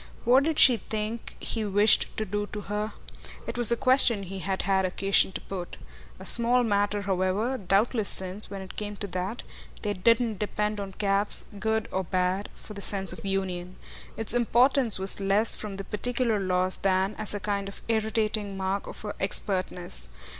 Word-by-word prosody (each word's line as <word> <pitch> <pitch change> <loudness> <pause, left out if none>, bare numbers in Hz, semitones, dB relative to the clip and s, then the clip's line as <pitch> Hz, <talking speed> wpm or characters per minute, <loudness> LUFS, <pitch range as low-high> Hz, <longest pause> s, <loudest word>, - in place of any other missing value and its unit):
What 255 +4 +4
did 320 -1 -1
she 250 -3 +7
think 215 +2 -6
he 225 - -3
wished 205 +1 +4
to 215 - -1
do 205 0 -3
to 210 +1 -7
her? 210 +1 -4 0.5
it - - -6
was 240 -2 +3
a 235 - +2
question 255 -5 +4
he 195 +1 -7
had 190 0 -3
had 195 -1 +1
occasion 195 +1 +2
to - - -4
put. 180 -3 -7 0.4
A - - -10
small 245 +1 +4
matter, 205 -2 0
however, 190 +6 -1
doubtless 205 +3 +1
since, 190 +2 +2
when 195 -1 -7
it 190 - -11
came 210 -1 -4
to 205 - -6
that, 185 +6 -4 0.4
they 205 -1 -1
didn't 225 +2 +1
depend 210 0 -2
on 195 -1 -6
cabs 200 0 +1
good 220 +1 -1
or 190 - -2
bad 185 +2 -1
for 215 - -11
the 200 - -8
sense 195 -2 0
of - - -11
union: 185 -2 -3 0.4
its 225 0 -4
importance 245 0 +3
was 190 +1 0
less 200 +3 +7
from 210 -2 -5
the 195 - -5
particular 235 +2 0
loss 185 -1 0
than 190 +1 0
as 210 -1 -2
a - - -3
kind 200 0 -3
of 200 - -13
irritating 215 -2 -1
mark 195 +1 -3
of - - -10
her 210 -1 -5
expertness. 185 - -2
205 Hz, 180 wpm, -26 LUFS, 190-220 Hz, 0.5 s, she